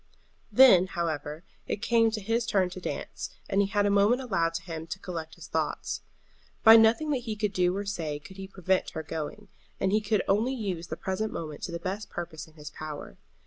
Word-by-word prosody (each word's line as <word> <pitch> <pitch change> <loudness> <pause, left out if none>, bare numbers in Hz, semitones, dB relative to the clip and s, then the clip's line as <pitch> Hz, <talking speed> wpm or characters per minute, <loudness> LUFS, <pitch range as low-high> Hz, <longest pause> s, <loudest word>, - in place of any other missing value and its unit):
Then, 205 -6 +8
however, 160 -3 -3 0.2
it 210 - -3
came 230 -1 +4
to 220 -1 -3
his 230 +3 0
turn 190 -3 +2
to 185 - -7
dance, - - -5 0.2
and 195 - +2
he 200 - +2
had 205 0 +1
a 205 - +3
moment 205 +5 +4
allowed 170 -10 0
to 170 - -3
him 165 -2 -6
to 165 - -4
collect 165 -4 -6
his - - -11
thoughts. - - -2 0.6
By 225 0 +10
nothing 230 +7 +5
that 280 - +2
he 220 -2 -2
could 210 -1 -1
do 180 0 +2
or 205 - -3
say 165 -7 -3
could 185 +6 -13
he 190 0 -6
prevent 190 -1 0
her 160 - -3
going, 160 +7 -5 0.3
and 190 - +1
he 215 +1 +3
could 210 -1 +1
only 225 +7 +2
use 185 -8 -3
the 160 - -5
present 195 +3 -2
moment 155 -3 -6
to 175 - -6
the 170 - -3
best 195 +4 -4
purpose 160 -3 -6
in 160 - -20
his 150 -1 -9
power. 150 - -8
190 Hz, 220 wpm, -28 LUFS, 165-215 Hz, 0.6 s, By